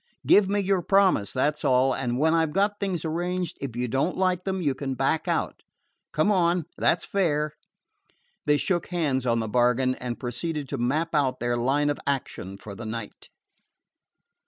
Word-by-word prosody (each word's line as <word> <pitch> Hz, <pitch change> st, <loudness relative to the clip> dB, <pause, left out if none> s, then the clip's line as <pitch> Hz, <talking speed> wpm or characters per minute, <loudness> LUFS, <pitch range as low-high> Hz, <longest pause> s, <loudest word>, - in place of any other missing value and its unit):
Give 200 Hz, -2 st, +5 dB
me 205 Hz, +1 st, +1 dB
your 195 Hz, -2 st, +1 dB
promise, 190 Hz, -, +3 dB
that 145 Hz, +3 st, +1 dB
's -, -, -11 dB
all, 130 Hz, -1 st, +3 dB
and 125 Hz, -2 st, -2 dB
when 160 Hz, +4 st, +3 dB
I 165 Hz, -1 st, +3 dB
've 155 Hz, -2 st, -3 dB
got 205 Hz, +1 st, +1 dB
things 185 Hz, -5 st, -2 dB
arranged, 175 Hz, +2 st, -2 dB
if 130 Hz, -5 st, -5 dB
you 125 Hz, +1 st, -1 dB
don't 135 Hz, +9 st, 0 dB
like 185 Hz, -1 st, +1 dB
them 190 Hz, -1 st, -1 dB
you 145 Hz, -6 st, +1 dB
can 135 Hz, -1 st, -4 dB
back 135 Hz, +4 st, 0 dB
out. -, -, -1 dB, 0.5 s
Come 155 Hz, +7 st, +2 dB
on; 175 Hz, -3 st, +2 dB
that -, -, +2 dB
's -, -, -6 dB
fair." 155 Hz, -6 st, 0 dB, 0.9 s
They 150 Hz, 0 st, +4 dB
shook 175 Hz, +2 st, -1 dB
hands 145 Hz, -8 st, -1 dB
on 115 Hz, -1 st, +2 dB
the 110 Hz, -1 st, -1 dB
bargain, 125 Hz, +3 st, +2 dB
and 125 Hz, -2 st, -5 dB
proceeded 140 Hz, +4 st, -3 dB
to 140 Hz, -, -3 dB
map 155 Hz, +8 st, 0 dB
out 140 Hz, -4 st, +1 dB
their 120 Hz, 0 st, 0 dB
line 140 Hz, +5 st, +1 dB
of 145 Hz, -, -4 dB
action 110 Hz, -8 st, -3 dB
for 100 Hz, 0 st, -9 dB
the 110 Hz, +3 st, -7 dB
night. 110 Hz, -1 st, -7 dB
145 Hz, 190 wpm, -26 LUFS, 125-175 Hz, 0.9 s, Give